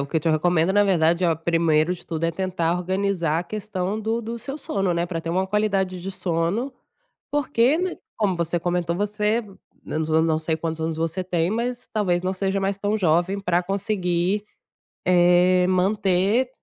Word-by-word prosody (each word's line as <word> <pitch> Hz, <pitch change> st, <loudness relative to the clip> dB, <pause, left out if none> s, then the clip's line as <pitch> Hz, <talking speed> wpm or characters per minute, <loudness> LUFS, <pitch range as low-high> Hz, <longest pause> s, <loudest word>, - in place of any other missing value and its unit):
o 140 Hz, -, -2 dB
que 140 Hz, -, -17 dB
eu -, -, +2 dB
te 160 Hz, -, +1 dB
recomendo, 165 Hz, +2 st, +2 dB
na 205 Hz, +1 st, +4 dB
verdade, 170 Hz, -1 st, +2 dB
ó, 165 Hz, -2 st, +3 dB
primeiro 165 Hz, 0 st, +2 dB
de 180 Hz, -, -9 dB
tudo 160 Hz, -1 st, -4 dB
é 165 Hz, -, +2 dB
tentar 175 Hz, -2 st, -1 dB
organizar 180 Hz, -2 st, 0 dB
a -, -, -4 dB
questão 205 Hz, 0 st, -3 dB
do 225 Hz, +2 st, -1 dB
do 230 Hz, +1 st, -5 dB
seu 270 Hz, +5 st, -6 dB
sono, 195 Hz, -, -1 dB
né, 170 Hz, +1 st, 0 dB
pra 170 Hz, -2 st, -3 dB
ter 165 Hz, -, -7 dB
uma 185 Hz, +3 st, +1 dB
qualidade 195 Hz, -2 st, 0 dB
de 190 Hz, -, -6 dB
sono, 185 Hz, +9 st, -1 dB, 0.6 s
porque, 280 Hz, 0 st, +2 dB
né, 365 Hz, 0 st, -2 dB, 0.2 s
como 200 Hz, -4 st, +1 dB
você 170 Hz, 0 st, -1 dB
comentou, 175 Hz, 0 st, -1 dB
você 210 Hz, +3 st, 0 dB, 0.4 s
não 155 Hz, -, -3 dB
s 160 Hz, -, -3 dB
não 160 Hz, -1 st, +1 dB
sei 160 Hz, 0 st, -1 dB
quantos 160 Hz, 0 st, -4 dB
anos 160 Hz, 0 st, -2 dB
você 165 Hz, +3 st, -2 dB
tem, 175 Hz, 0 st, 0 dB
mas 240 Hz, +2 st, -2 dB
talvez 185 Hz, -4 st, +1 dB
não 185 Hz, +1 st, 0 dB
seja 195 Hz, +1 st, -1 dB
mais 195 Hz, +1 st, 0 dB
tão 205 Hz, +2 st, 0 dB
jovem 175 Hz, +1 st, +1 dB
pra 180 Hz, -2 st, +1 dB
conseguir, 190 Hz, 0 st, -1 dB, 0.6 s
eh, 180 Hz, 0 st, +4 dB
manter 195 Hz, +5 st, +2 dB
185 Hz, 190 wpm, -23 LUFS, 170-205 Hz, 0.6 s, na